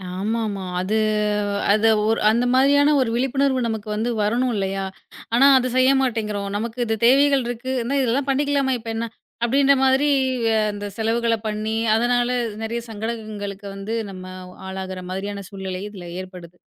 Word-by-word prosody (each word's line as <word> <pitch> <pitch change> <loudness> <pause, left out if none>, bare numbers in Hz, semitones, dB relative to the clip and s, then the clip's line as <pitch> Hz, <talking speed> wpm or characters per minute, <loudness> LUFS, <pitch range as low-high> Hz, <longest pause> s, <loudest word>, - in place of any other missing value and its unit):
ஆமாமா. 210 0 -2 0.2
அது 200 +4 0 0.8
அது, 215 +1 +3 0.2
ஒரு 225 - +2
அந்த 240 +2 +1
மாரியான 285 +2 +5
ஒரு 250 - 0
விழிப்புணர்வு 265 +1 +1
நமக்கு 220 -1 -4
வந்து 225 +3 -1
வரணும் 240 +5 +1
இல்லையா? 195 0 -2 0.5
ஆனா 270 +3 +6
அது 255 - +1
செய்ய 255 +1 +5
மாட்டேங்குறோம். 210 -5 -2
நமக்கு 230 +3 -5
இது 225 0 0
தேவைகள் 275 +1 +5
இருக்கு, 245 +2 -4 0.3
இதெல்லாம் 260 +3 0
பண்ணிக்கலாமே, 275 -1 +1
இப்ப 225 0 -8
என்ன? 230 +1 -2 0.4
அப்படின்னு 275 +3 +4
மாரி 265 +2 +3 0.6
அந்தச் 205 -1 -7
செலவுகளப் 230 0 0
பண்ணி, 215 +1 -2 0.2
அதனால 245 +1 +2 0.3
நிறைய 230 +1 -2
சங்கடங்களுக்கு 215 -2 -5
வந்து 195 +3 -5 0.2
நாம 185 -1 -9 0.4
ஆளாகுற 190 -1 -5
மாரியான 200 +1 -4
சூழ்நிலை 190 -2 -5
இதுல 190 -4 -10 0.2
ஏற்படுது. 180 -2 -11
225 Hz, 140 wpm, -22 LUFS, 200-255 Hz, 0.8 s, ஆனா